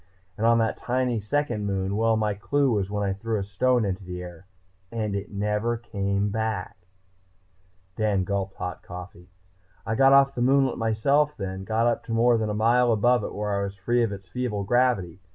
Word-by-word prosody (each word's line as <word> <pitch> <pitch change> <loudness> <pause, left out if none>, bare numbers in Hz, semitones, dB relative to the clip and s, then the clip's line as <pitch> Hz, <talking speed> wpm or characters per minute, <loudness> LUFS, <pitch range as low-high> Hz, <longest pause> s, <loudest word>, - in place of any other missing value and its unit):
And 110 +3 +1
on 115 0 +5
that 115 -1 0
tiny 125 -2 -1
second 110 -1 -1
moon 95 0 -1
well, 115 +1 +2
my 105 -1 0
clue 140 +7 +1
was 100 -3 0
when 105 0 -2
I 95 - 0
threw 110 +3 -3
a 100 - -2
stone 115 +5 +1
into 95 0 -3
the 90 0 -6
air 90 +1 -11 0.4
and 110 -3 -2
it 100 0 -5
never 105 +3 -1
came 100 -3 -2
back." 105 -4 -4 1.1
Dan 105 -3 +1
gulped 95 0 -3
hot 90 0 -5
coffee. 90 0 -10 0.6
"I 115 - -1
got 135 +3 +5
off 135 0 +6
the 120 - -3
moonlet 135 0 +3
myself 140 +7 +1
then, 95 -1 -5
got 115 +2 +1
up 120 -1 +1
to 115 - -4
more 115 0 +4
than 110 -1 -1
a 105 - -2
mile 120 +3 +3
above 120 +3 +3
it - - -4
where 105 0 -2
I 100 0 0
was 100 0 -4
free 120 +6 0
of 115 -3 +1
its 100 -1 -8
feeble 105 0 -3
gravity. 100 -6 +1
105 Hz, 200 wpm, -25 LUFS, 100-120 Hz, 1.1 s, off